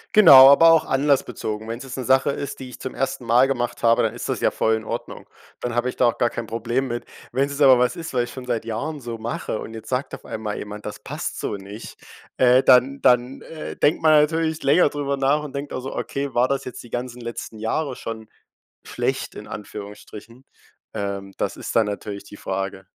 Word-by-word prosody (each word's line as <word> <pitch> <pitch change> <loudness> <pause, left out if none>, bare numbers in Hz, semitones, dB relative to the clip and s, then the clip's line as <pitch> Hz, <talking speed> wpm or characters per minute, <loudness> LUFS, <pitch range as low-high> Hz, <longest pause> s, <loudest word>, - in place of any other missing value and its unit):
Genau, 135 -11 +10
aber 165 +4 +7
auch 165 - +4
anlassbezogen. 135 -6 0
Wenn's 115 +3 -5
jetzt 135 0 -8
'ne 130 - -3
Sache 130 +3 +3
ist, 140 0 -4
die 130 -1 -8
ich 120 - -11
zum 130 - -6
1. 130 -1 -3
Mal 120 +3 +4
gemacht 120 -3 -2
habe, 115 0 +4
dann - - 0
ist - - -6
das - - -2
ja - - +3
voll 110 - +1
in 110 - -5
Ordnung. 115 +2 -6 0.3
Dann 120 -1 -3
habe 120 +1 0
ich - - -6
da 125 - +2
auch 115 - -1
gar 120 - +3
kein 115 0 -5
Problem 120 +4 -2
mit. 120 0 -4 0.3
Wenn's 135 +3 0
jetzt 140 +1 -5
aber 130 -2 +7
was 125 0 +2
ist, 165 -3 -7
was 125 - +2
ich - - -11
schon 130 -1 -8
seit 120 -2 -2
Jahren 140 +7 -4
so 120 -2 -6
mache 110 -1 -4
und 110 - -8
jetzt 110 0 -9
sagt 130 +2 -2
auf - - -8
einmal 110 -1 -5
jemand, 105 0 -8
das - - -6
passt - - -5
so - - -3
nicht, 100 +2 -10 0.4
äh, 130 0 +5
dann 135 +2 +4
dann, 125 +1 +2
äh, 160 -1 -8
denkt 150 - +1
man 155 - +6
natürlich 160 +1 0
länger 145 +3 +4
drüber 140 -1 -2
nach 140 +3 +2
und 145 -2 -8
denkt 140 +1 -5
also: 130 +1 -5
„Okay, 140 0 -3
war 125 +2 +4
das 135 0 -1
jetzt 125 - -8
die 120 - -15
ganzen 125 0 -4
letzten 115 -1 -7
Jahre 130 +5 -2
schon 110 -1 -7 0.5
schlecht - - -3
in - - -9
Anführungsstrichen?“ 105 +4 -10 0.5
Ähm, 100 -1 -4
das - - -2
ist - - -5
dann 115 - +5
natürlich 100 -1 -5
die 105 - -12
Frage. 95 0 -4
125 Hz, 225 wpm, -22 LUFS, 110-135 Hz, 0.5 s, Genau